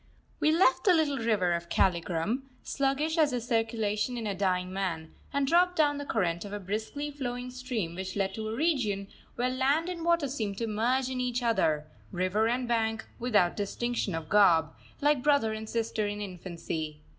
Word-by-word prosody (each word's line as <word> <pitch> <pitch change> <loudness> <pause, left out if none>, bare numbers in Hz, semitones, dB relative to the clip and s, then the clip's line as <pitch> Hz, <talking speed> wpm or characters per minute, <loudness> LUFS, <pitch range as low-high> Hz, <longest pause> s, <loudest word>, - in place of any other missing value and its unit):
We 305 - +3
left 330 -1 +4
the 370 -3 +6
little 290 -4 +1
river 210 -6 +2
of 170 0 -3
Kaligram, 175 - +1 0.2
sluggish 285 +4 0
as 305 -2 +5
the 250 -2 -1
circulation 225 -1 -1
in 230 - -4
a 205 - -1
dying 185 -1 0
man, 170 -5 -3 0.2
and 280 0 +1
dropped 355 +4 +3
down 290 -3 +2
the 285 - -6
current 175 -6 0
of 205 - -8
a 205 - -4
briskly 220 +10 -4
flowing 250 -3 -4
stream 250 -9 -3
which 185 +1 -5
led 195 -1 0
to 220 -1 -4
a 220 - -3
region 230 -10 0 0.3
where 250 +1 0
land 280 +6 +1
and 345 -2 -5
water 340 -3 +2
seemed 220 -7 -3
to 230 - -1
merge 245 +5 0
in 255 -1 -2
each 245 0 -1
other, 160 -10 +2 0.3
river 185 +4 +1
and 245 +1 0
bank 225 -2 0
without 210 -8 +2
distinction 210 -1 -2
of 165 -1 -5
garb, 165 -5 +5 0.3
like 290 -2 +3
brother 280 -6 +3
and 220 0 -6
sister 225 -2 -1
in 205 0 -4
infancy. 170 -5 -5
225 Hz, 185 wpm, -29 LUFS, 195-265 Hz, 0.3 s, the